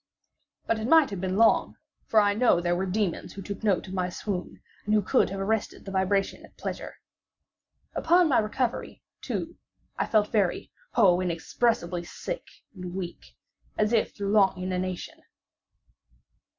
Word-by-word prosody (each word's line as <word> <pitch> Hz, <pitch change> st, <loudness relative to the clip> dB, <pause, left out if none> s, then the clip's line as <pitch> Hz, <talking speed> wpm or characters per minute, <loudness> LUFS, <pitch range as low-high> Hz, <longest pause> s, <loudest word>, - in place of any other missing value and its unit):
But 230 Hz, -, 0 dB
it 220 Hz, -, -3 dB
might 315 Hz, -4 st, +5 dB
have 195 Hz, -3 st, -4 dB
been 185 Hz, 0 st, -1 dB
long; 225 Hz, +1 st, +4 dB, 0.3 s
for 220 Hz, -, +5 dB
I 205 Hz, -1 st, +4 dB
knew 220 Hz, -4 st, +4 dB
there 175 Hz, 0 st, 0 dB
were 190 Hz, +2 st, -1 dB
demons 195 Hz, -2 st, -2 dB
who 195 Hz, -, -8 dB
took 200 Hz, +3 st, -7 dB
note 200 Hz, -4 st, +1 dB
of 190 Hz, -, -8 dB
my 180 Hz, -1 st, -1 dB
swoon, 180 Hz, 0 st, -5 dB, 0.2 s
and 210 Hz, +1 st, +1 dB
who 210 Hz, -, +4 dB
could -, -, +3 dB
have 195 Hz, +1 st, -5 dB
arrested 215 Hz, +2 st, -2 dB
the 195 Hz, -, -6 dB
vibration 195 Hz, +1 st, 0 dB
at -, -, -17 dB
pleasure. -, -, -5 dB, 1.0 s
Upon 345 Hz, +1 st, +4 dB
my 270 Hz, -, +4 dB
recovery, 230 Hz, +3 st, -2 dB, 0.2 s
too, -, -, -4 dB, 0.4 s
I -, -, +1 dB
felt 210 Hz, -2 st, +2 dB
very—oh! 200 Hz, -, +1 dB
inexpressibly—sick 180 Hz, -, -2 dB, 0.3 s
and 180 Hz, -2 st, -7 dB
weak, 180 Hz, -2 st, -7 dB, 0.4 s
as 215 Hz, +2 st, +1 dB
if 225 Hz, -, +1 dB
through 200 Hz, -1 st, -2 dB
long 195 Hz, -3 st, +4 dB
inanition. 185 Hz, 0 st, -4 dB
200 Hz, 150 wpm, -27 LUFS, 185-220 Hz, 1.0 s, might